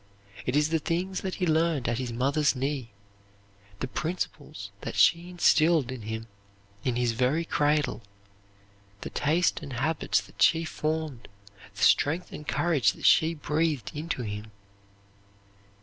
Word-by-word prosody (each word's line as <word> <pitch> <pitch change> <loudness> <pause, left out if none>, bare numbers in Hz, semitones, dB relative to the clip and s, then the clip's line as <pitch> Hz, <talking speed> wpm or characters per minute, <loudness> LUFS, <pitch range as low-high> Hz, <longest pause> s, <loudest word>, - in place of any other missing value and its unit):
It 125 - 0
is 150 +1 +3
the 160 0 +1
things 180 +5 -2
that 190 -1 -3
he 185 - -1
learned 160 -4 +1
at 120 +1 0
his 125 -2 -3
mother's 140 +5 +1
knee, 135 -2 -2 0.9
the 130 - -1
principles 145 - -4
that - - -5
she 170 +1 +4
instilled 160 -5 +3
in 130 -3 -6
him 110 +1 -5 0.6
in 125 -2 0
his 120 -1 +1
very 130 +8 +1
cradle, 150 -4 +1 1.0
the - - -6
taste 165 +5 +1
and 140 -4 -7
habits 150 +7 +1
that - - -15
she 165 0 +4
formed, 155 -5 -3 0.5
the - - -3
strength 160 +5 +3
and 150 - -9
courage 140 - +2
that - - -8
she 160 +1 +5
breathed 150 -2 -1
into 150 -4 -3
him. 105 0 -6
150 Hz, 145 wpm, -27 LUFS, 125-165 Hz, 1.0 s, she